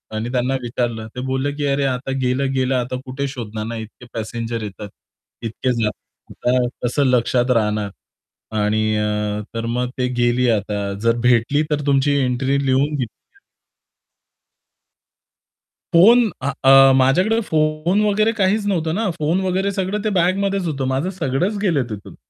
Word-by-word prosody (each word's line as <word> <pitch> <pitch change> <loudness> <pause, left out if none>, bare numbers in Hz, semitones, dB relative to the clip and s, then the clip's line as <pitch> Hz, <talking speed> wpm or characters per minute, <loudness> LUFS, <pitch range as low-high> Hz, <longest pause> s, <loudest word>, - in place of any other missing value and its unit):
आणि 110 +2 -3
त्यांना 125 +1 0
विचारलं 120 -2 -3
ते 125 - -4
बोलले, 130 +2 0
की 145 0 -2
"अरे, 140 0 +1
आता 130 0 -2
गेलं, 130 +2 0
गेलं 130 0 +1
आता 125 0 -2
कुठे 135 +2 -3
शोधणार 110 -5 -6
ना? 115 +1 -5
इतके 110 +2 -10
पॅसेंजर 115 0 -4
येतात, 105 0 -7 0.5
इतके 115 +3 -2
जातात. 125 +3 -2
कसं 130 +4 +1
लक्षात 125 0 +2
राहणार? 105 -1 -1 0.7
आणि 105 +1 +1 0.2
अ, 105 0 -1
तर 115 0 -2
मग 125 0 -1
ते 125 -1 0
गेली 120 +1 +2
आता 105 -2 0 0.3
जर 115 0 +3
भेटली 125 +4 +3
तर 150 0 +1
तुमची 140 0 +3
एंट्री 135 +3 0
लिहून 135 +3 +2
घे" 130 -4 -1 2.9
फोन 225 +7 +6
आ 140 - 0
अ, 135 0 +8
माझ्याकडे 180 - +3
फोन 155 +5 +1
वगैरे 215 +2 +2
काहीच 205 +1 +1
नव्हतं 165 -5 0
ना, 215 0 0
फोन 155 +4 +1
वगैरे 190 +1 0
सगळं 195 +1 -2
ते 215 - +1
बॅगमध्येच 195 +2 +1
होतं. 140 -4 -2
माझं 135 +7 -1
सगळंच 180 +3 -1
गेलं 165 -10 +1
तिथून. 105 -2 -8
130 Hz, 150 wpm, -20 LUFS, 120-160 Hz, 2.9 s, अ